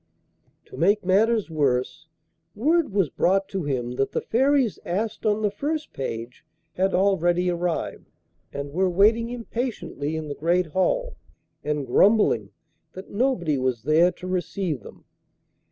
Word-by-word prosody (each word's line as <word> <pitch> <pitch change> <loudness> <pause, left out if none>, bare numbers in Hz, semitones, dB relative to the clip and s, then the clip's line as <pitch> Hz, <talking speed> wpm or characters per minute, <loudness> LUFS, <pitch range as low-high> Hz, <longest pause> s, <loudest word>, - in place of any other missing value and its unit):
To - - -12
make 200 +4 +2
matters 210 +1 +2
worse, 140 0 0 0.5
word 310 +4 +2
was 195 -7 +1
brought 195 +2 +1
to 190 -5 -3
him 125 -4 -2
that 135 - 0
the - - 0
Fairies 265 -1 +2
asked 215 +5 -2
on 215 +1 +1
the 205 - +2
first 300 +8 -3
page 120 -2 -6 0.3
had 190 +1 +1
already 180 -2 +2
arrived 175 -1 -3 0.4
and 140 0 -5
were 185 +2 +2
waiting 220 +6 +3
impatiently 230 - -4
in 160 -1 -4
the 145 - -4
Great 175 +5 +1
Hall, - - -1 0.5
and 150 -2 -2
grumbling 130 - +3 0.4
that 190 - -10
nobody 195 - 0
was 130 -4 -1
there 160 +5 +4
to 180 - -11
receive 180 - -2
them. - - -14
185 Hz, 140 wpm, -24 LUFS, 150-215 Hz, 0.5 s, there